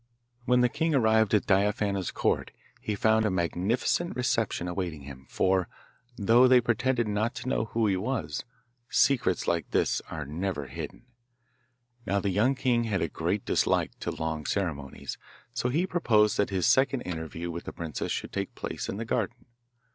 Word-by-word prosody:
When 125 0 +4
the 125 - +5
king 160 +5 0
arrived 110 -4 +4
at 105 - +2
Diaphana's 100 -1 +1
Court - - 0 0.3
he 105 - -3
found 110 +2 +3
a 105 - +2
magnificent 95 - 0
reception 115 -7 0
awaiting 90 -4 -3
him, 65 -1 -11
for, 95 -1 +1 0.5
though 115 +5 +5
they 125 0 +7
pretended 120 0 +1
not 105 +2 -1
to - - -6
know 115 - 0
who 110 +1 0
he 100 -2 +2
was, 115 +6 -2 0.5
secrets 120 -10 +2
like 85 -2 0
this - - +1
are 80 -2 -5
never 80 0 -3
hidden. 70 - -8 1.0
Now 100 +1 +2
the 100 0 -1
young 115 +8 +2
king 125 -3 +1
had 100 -5 0
a - - 0
great - - -2
dislike - - +1
to - - -3
long 80 -1 -3
ceremonies, 75 -9 -3 0.3
so 125 - -1
he 160 +8 +1
proposed 110 - +3
that 100 - +2
his 95 -3 0
second 135 -1 +3
interview 85 0 -5
with 85 +1 -6
the - - -5
princess 80 -3 -4
should - - -3
take 100 -1 -3
place - - -5
in 100 - -3
the 115 - -4
garden. 115 +1 -2
105 Hz, 170 wpm, -28 LUFS, 90-120 Hz, 1.0 s, they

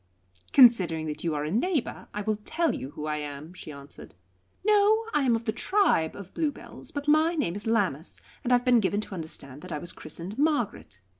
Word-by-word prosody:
"Considering 190 - +6
that 150 -1 -5
you 165 -3 0
are 145 - -1
a 150 - -3
neighbour, 290 - -1
I 210 - -4
will 215 0 0
tell 320 +10 -1
you 130 - -5
who 150 +1 -7
I 150 0 -1
am," 150 +2 -7
she 165 - -9
answered. 140 0 -12 0.5
"No; 425 +1 +4
I 295 - +3
am 250 -4 +3
of 225 0 -4
the 220 - +1
tribe 235 - +2
of 200 -2 -10
Bluebells, 305 -3 -4
but 285 0 -5
my 310 +3 +4
name 180 - -1
is 205 +2 -5
Lammas, 190 -9 0 0.2
and 250 - -1
I - - +7
have 245 +1 0
been 245 -2 +5
given 205 0 0
to 210 - -8
understand 150 -5 -6
that 185 - -10
I 150 - -2
was 175 +4 -6
christened 190 +8 -7
Margaret. 240 - -1
205 Hz, 215 wpm, -27 LUFS, -, 0.5 s, I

